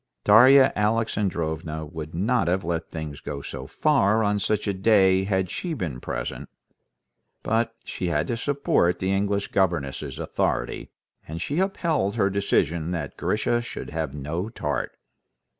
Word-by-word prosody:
Darya 130 +6 +7
Alexandrovna 90 -8 -1
would 80 0 -7
not 105 +1 +1
have 90 +2 +1
let 85 -1 -3
things 80 -3 -6
go 70 0 -6
so 65 - -7
far 110 - +2
on 105 0 +1
such 105 +2 -1
a 100 - +1
day 95 -1 +4
had 95 -2 0
she 170 -3 -3
been 80 - -4
present; - - -5 0.9
but 115 +1 0
she 90 - -4
had 75 -3 +1
to 120 - -2
support 120 -9 +1
the 95 +1 -1
English 100 +1 0
governess's 85 -8 -1
authority, - - -2 0.4
and 80 +2 -5
she 145 - -2
upheld 165 - 0
her 100 -4 +2
decision 85 -4 0
that 85 -6 -4
Grisha 120 +3 0
should 120 - -7
have 80 -3 -2
no 75 +8 -4
tart. 75 -10 -3
95 Hz, 145 wpm, -25 LUFS, 80-110 Hz, 0.9 s, Darya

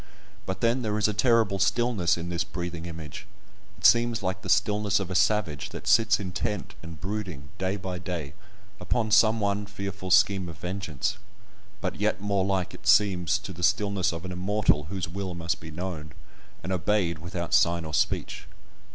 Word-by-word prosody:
But 95 0 -3
then 120 +2 +2
there 105 -2 -1
is 105 - +3
a 105 - -1
terrible 110 -3 +3
stillness 100 -3 +2
in 85 +1 -5
this 85 -1 0
breathing 85 -1 -5
image; 80 -5 -8 0.5
it - - -6
seems 120 -2 +5
like 95 0 -2
the - - -7
stillness 105 -1 +2
of 95 -2 -4
a - - -1
savage 100 -6 +1
that - - -8
sits 110 -1 +4
intent 95 0 -3
and 80 -1 -9
brooding, 95 -8 -5
day 95 +1 0
by 95 -2 -5
day, 85 -5 -5 0.5
upon 110 +4 -1
some 110 +2 +5
one 100 0 0
fearful 100 -2 -6
scheme 95 -1 +4
of 80 - -9
vengeance, 100 +4 -3 0.6
but 90 -3 -3
yet 105 +1 0
more 100 -1 0
like 95 -2 -1
it - - -10
seems 95 -2 +4
to 95 -2 -8
the 90 - -9
stillness 100 0 +2
of 85 +2 -6
an 95 - -5
Immortal, 90 -4 +1
whose 95 +2 -4
will 95 +1 -5
must 85 0 -2
be 80 - -9
known, 80 -2 -6 0.5
and 95 - -4
obeyed 90 -3 +1
without 85 +2 -5
sign 85 -4 +3
or 80 - -7
speech. 95 - -1
95 Hz, 180 wpm, -27 LUFS, 85-105 Hz, 0.6 s, seems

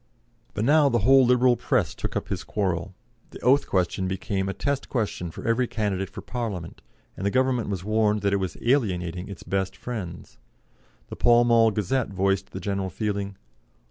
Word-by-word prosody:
But 105 - 0
now 145 +1 +5
the 120 - +2
whole 135 -1 +6
Liberal 125 0 +4
Press - - 0
took - - -5
up - - -3
his - - -3
quarrel; 95 -2 -2 0.3
the - - -11
oath 135 +4 +4
question 95 0 0
became 95 +1 -2
a - - -2
test 140 -1 -2
question 105 -8 -2
for 80 - -8
every 120 +2 +2
candidate 105 -5 -2
for - - -8
Parliament, 105 -9 -5 0.3
and - - -7
the 100 - +2
Government 130 -1 +1
was 95 -3 -3
warned 105 0 +1
that 100 0 +2
it - - +3
was 95 -3 -3
alienating 90 -9 0
its 100 -4 -9
best 95 -1 -2
friends. 100 -9 -7 0.7
The - - -6
Pall 120 0 +5
Mall 115 -1 +5
Gazette 110 +5 -1
voiced 95 0 0
the 95 - -7
general 100 -1 -2
feeling. 100 -2 -3
105 Hz, 180 wpm, -25 LUFS, 95-120 Hz, 0.7 s, whole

